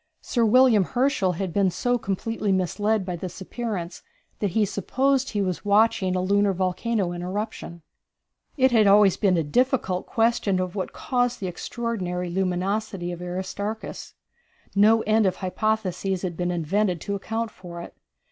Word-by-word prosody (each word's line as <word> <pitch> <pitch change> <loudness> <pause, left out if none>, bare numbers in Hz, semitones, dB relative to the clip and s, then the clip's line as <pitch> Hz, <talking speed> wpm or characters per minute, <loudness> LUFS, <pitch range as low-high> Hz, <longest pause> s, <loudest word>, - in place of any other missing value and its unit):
Sir 240 - 0
William 230 -2 +5
Herschel 240 -4 +1
had 180 0 -4
been 200 -2 +3
so 245 +7 0
completely 210 +1 -2
misled 200 +3 0
by 180 -1 -3
this 180 +2 -7
appearance 195 -3 -5 0.4
that 205 - 0
he 215 - +4
supposed 265 +7 0
he 205 -2 -1
was 185 -2 -3
watching 205 -2 +3
a 185 - +1
lunar 200 +1 +2
volcano 185 +2 -1
in 175 0 -5
eruption. 185 -3 -5 0.7
It 260 -1 +4
had 220 -3 +5
always 200 -1 +6
been 190 -4 +2
a 165 - +1
difficult 190 - 0
question 225 -4 +1
what 185 +1 -3
caused 245 -1 -1
the 195 - -4
extraordinary 180 -2 -3
luminosity 190 0 -1
of 175 0 -7
Aristarchus. 190 +4 -5 0.6
No 220 +3 +5
end 215 -1 +3
of 185 - 0
hypotheses 195 -1 -1
had 175 -3 -3
been 175 +1 -1
invented 180 +2 0
to 200 - -3
account 225 +3 -3
for 175 -3 -10
it. 170 - -9
200 Hz, 155 wpm, -25 LUFS, 180-220 Hz, 0.7 s, always